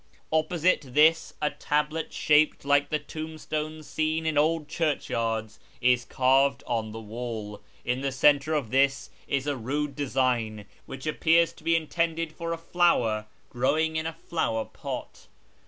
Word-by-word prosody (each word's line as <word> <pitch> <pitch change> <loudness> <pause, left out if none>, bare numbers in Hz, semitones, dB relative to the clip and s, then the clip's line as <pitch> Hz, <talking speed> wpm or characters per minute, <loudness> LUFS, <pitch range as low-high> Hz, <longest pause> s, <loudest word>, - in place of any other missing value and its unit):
Opposite 165 +3 +2
this 150 +4 +3
a 150 - +2
tablet 150 +2 -1
shaped 150 -2 +3
like 145 0 +3
the 155 - +1
tombstones 155 0 -5
seen 155 +1 -1
in 160 -1 0
old 155 +1 +2
churchyards 115 -9 -2 0.2
is 125 0 +3
carved 135 +1 +2
on 110 -2 -2
the 110 - -7
wall. 110 -2 -6 0.2
In 125 +2 -1
the 135 0 -1
centre 145 +3 +3
of 130 -8 -2
this 135 0 +2 0.2
is 135 -1 -1
a 145 -1 0
rude 140 +4 -3
design, 125 -6 0 0.2
which 135 +1 -8
appears 165 +2 +3
to - - -18
be 165 - +3
intended 165 0 -1
for 165 +1 -5
a 165 - -1
flower 125 -11 +1 0.2
growing 155 +6 +1
in 160 0 -1
a 165 - -4
flower 115 -10 0
pot. - - -7
145 Hz, 150 wpm, -27 LUFS, 125-160 Hz, 0.2 s, this